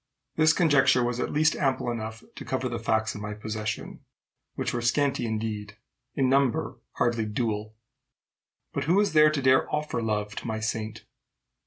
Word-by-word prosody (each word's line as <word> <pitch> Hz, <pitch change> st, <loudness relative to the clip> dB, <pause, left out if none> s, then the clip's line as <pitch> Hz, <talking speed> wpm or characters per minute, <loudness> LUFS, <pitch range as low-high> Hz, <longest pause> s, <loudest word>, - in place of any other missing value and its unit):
This 155 Hz, 0 st, +5 dB
conjecture 145 Hz, -7 st, +4 dB
was 120 Hz, 0 st, -1 dB
at -, -, -2 dB
least 155 Hz, +2 st, +3 dB
ample 135 Hz, -4 st, 0 dB
enough 110 Hz, -1 st, -5 dB
to -, -, -7 dB
cover 130 Hz, -1 st, -2 dB
the 120 Hz, -1 st, -3 dB
facts 110 Hz, 0 st, 0 dB
in 105 Hz, -, -8 dB
my 105 Hz, 0 st, -5 dB
possession 105 Hz, 0 st, -5 dB, 0.6 s
which -, -, -2 dB
were 120 Hz, -, -1 dB
scanty 125 Hz, 0 st, +1 dB
indeed, 105 Hz, -2 st, -4 dB, 0.4 s
in 135 Hz, -2 st, +2 dB
number 130 Hz, -3 st, +1 dB
hardly 120 Hz, -3 st, 0 dB
dual. 110 Hz, -1 st, -2 dB, 1.0 s
But 140 Hz, -, -2 dB
who 170 Hz, +5 st, +3 dB
was 205 Hz, -4 st, +2 dB
there 155 Hz, 0 st, +7 dB
to 150 Hz, -2 st, -1 dB
dare 130 Hz, 0 st, +4 dB
offer 150 Hz, -5 st, -1 dB
love 105 Hz, -2 st, -2 dB
to -, -, -5 dB
my 110 Hz, -1 st, -2 dB
saint? 110 Hz, 0 st, -3 dB
120 Hz, 170 wpm, -27 LUFS, 110-135 Hz, 1.0 s, there